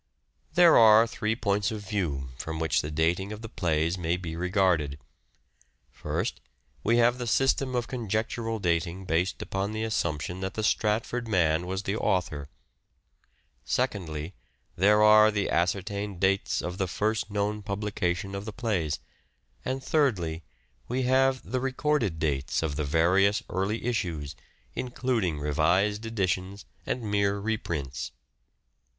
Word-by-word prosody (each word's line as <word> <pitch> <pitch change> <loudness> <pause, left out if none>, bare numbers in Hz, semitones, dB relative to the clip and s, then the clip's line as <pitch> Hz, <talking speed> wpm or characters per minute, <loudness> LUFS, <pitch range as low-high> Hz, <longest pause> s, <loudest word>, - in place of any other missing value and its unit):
There 175 -5 +7
are 110 0 +8
three 110 -1 -2
points 105 -2 0
of 105 -3 -6
view 75 -10 -2
from 80 0 -4
which 80 -1 +1
the 75 - -5
dating 85 +6 0
of 105 +1 -7
the - - -5
plays 85 -3 0
may 85 +1 0
be 85 -3 -6
regarded. 90 -5 +1 0.9
First, - - -3 0.4
we 115 +3 +3
have 120 +1 +3
the 120 - -3
system 135 +1 +2
of 120 -1 -1
conjectural 115 -1 -2
dating 85 0 -1
based 90 +3 0
upon 100 +2 -3
the 110 0 -2
assump 85 -9 -1
tion 90 +4 -5
that 95 0 -4
the 110 - -2
Stratford 115 +3 0
man 85 -4 +2
was 95 +1 -3
the 100 +1 -1
author; 80 -9 -1 1.1
secondly, 80 +3 -2 0.4
there 105 +3 +4
are 105 0 +7
the 105 -2 -1
ascertained 100 +2 -1
dates 95 +1 +1
of 90 +2 -5
the 95 - +1
first 110 +3 -1
known 105 +1 -1
publication 100 -2 -2
of 100 +1 -5
the 110 - -5
plays; 100 - -1 0.7
and 130 +1 -3
thirdly, 105 - +1 0.5
we 130 +2 -1
have 130 +1 +3
the 130 - -1
recorded 135 - 0
dates 70 -2 -1
of 75 -3 -2
the 75 - -1
various 90 +7 +3
early 95 +6 -1
issues, 85 - -2 0.4
including 120 - -1
revised 85 +9 +1
editions 95 -2 -2 0.2
and 125 - -2
mere 100 -1 +1
reprints. 80 - -3
100 Hz, 140 wpm, -27 LUFS, 85-110 Hz, 1.1 s, are